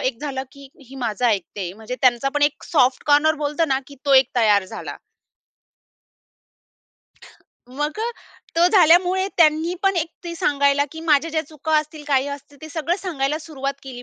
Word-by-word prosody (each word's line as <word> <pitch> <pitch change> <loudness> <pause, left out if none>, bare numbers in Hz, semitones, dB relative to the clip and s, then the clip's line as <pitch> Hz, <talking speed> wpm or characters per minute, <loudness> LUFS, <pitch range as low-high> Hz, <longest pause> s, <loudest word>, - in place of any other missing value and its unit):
अ, - - -26
झालं 270 -3 -3
की 280 +1 -14 0.2
हे 270 - -11
माझं 235 -2 -2
ऐकते 195 -4 -1
म्हणजे 220 +4 -7
त्यांचा 255 0 +3
पण 290 - 0
एक 290 0 0
सॉफ्ट 260 -5 +2
कॉर्नर 295 +2 +4
बोलतो 300 +3 0
ना 270 -2 0
की 280 - -13
तो 280 - +3
एक 265 -1 +6
तयार 205 -4 +4
झाला. - - -8 2.7
मग, 295 +7 -4 0.6
तो 340 - +5
झाल्यामुळे 365 +1 +4
त्यांनी 320 +1 +3
पण 390 -1 +2
एक 325 -1 0 0.2
ते 340 -1 -5
सांगायला 285 -2 +2
की 320 - -8
माझ्या 320 0 +2
ज्या 315 0 -1
चुका 310 +1 -5
असतील, 305 0 -6
काही 275 -2 +1
असतील 285 0 -9
ते 315 - -8
सगळं 325 +2 -2
सांगायला 305 -6 -2
सुरुवात 280 -3 -5
केली. 255 -2 -9
290 Hz, 165 wpm, -21 LUFS, 265-320 Hz, 2.7 s, एक